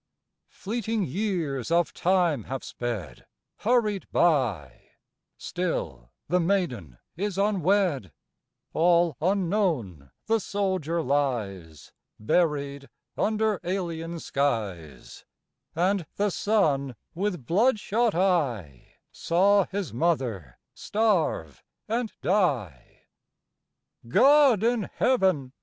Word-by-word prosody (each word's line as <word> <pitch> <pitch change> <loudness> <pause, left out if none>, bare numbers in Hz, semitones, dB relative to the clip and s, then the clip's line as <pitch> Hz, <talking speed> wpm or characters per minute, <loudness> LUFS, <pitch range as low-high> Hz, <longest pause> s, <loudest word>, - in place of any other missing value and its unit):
Fleeting 220 0 -3
years 165 - -2
of 170 +1 +2
time 175 - +1
have 135 +1 -5
sped 105 - -6 0.3
hurried 215 -4 +1
by 120 - 0 0.5
Still 80 - -4 0.2
the 180 - +2
maiden 165 - -1 0.2
is 200 +1 -3
unwed; 190 - +1 0.6
All 170 -1 +3
unknown 170 - 0 0.2
the 225 0 +2
soldier 185 -5 -1
lies, 105 - -2 0.3
Buried 140 +1 0 0.3
under 215 -1 0
alien 170 -2 -3
skies; 105 - -3 0.5
And 180 0 +1
the 205 0 0
son, 150 - +1 0.2
with 180 -6 -3
blood 215 - +2
shot 225 0 0
eye 125 - -1 0.2
Saw 195 +3 +3
his 195 - -4
mother 120 - -1 0.2
starve 185 - 0 0.3
and 230 0 -1
die. 135 - -1 1.1
God 270 - +5
in 235 -3 +1
Heaven! 185 - +1
170 Hz, 90 wpm, -26 LUFS, 125-200 Hz, 1.1 s, God